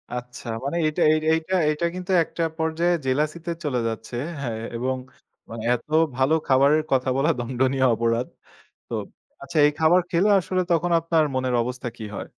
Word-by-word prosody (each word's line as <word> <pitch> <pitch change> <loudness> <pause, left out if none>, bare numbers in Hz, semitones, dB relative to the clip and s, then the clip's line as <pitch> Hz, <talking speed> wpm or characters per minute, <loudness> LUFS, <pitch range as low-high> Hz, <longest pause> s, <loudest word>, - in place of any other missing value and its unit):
আচ্ছা, 125 0 -8 0.2
মানে 145 +5 -2
এইটা, 155 +3 -1 0.3
এইটা, 165 +4 -1
এইটা 155 +3 -1
কিন্তু 185 +1 -5
একটা 165 - -4
পর্যায়ে 160 +2 +1
জেলাসি 150 +5 0
তে 170 - -2
চলে 125 -4 0
যাচ্ছে। 115 +1 -5 0.3
হ্যা, 125 - -2 0.3
এবং 130 +2 -1 0.5
মানে 115 -1 -7
এত 120 - -10 0.3
ভালো 135 +4 +2
খাবারের 140 +3 +4
কথা 130 0 +2
বলা 150 +4 +2
দন্ডনীয় 130 +2 0
অপরাধ। 115 +2 0 0.6
তো - - -8 0.5
আচ্ছা 140 +3 -5
এই - - +1
খাবার 170 +3 +5
খেলে, 185 +5 +3
আসলে 185 0 -1
তখন 170 +1 +2
আপনার 165 -1 +2
মনের 130 -1 0
অবস্থা 125 0 -5
কী 110 - -7
হয়? - - -6
140 Hz, 165 wpm, -24 LUFS, 125-165 Hz, 0.6 s, খাবার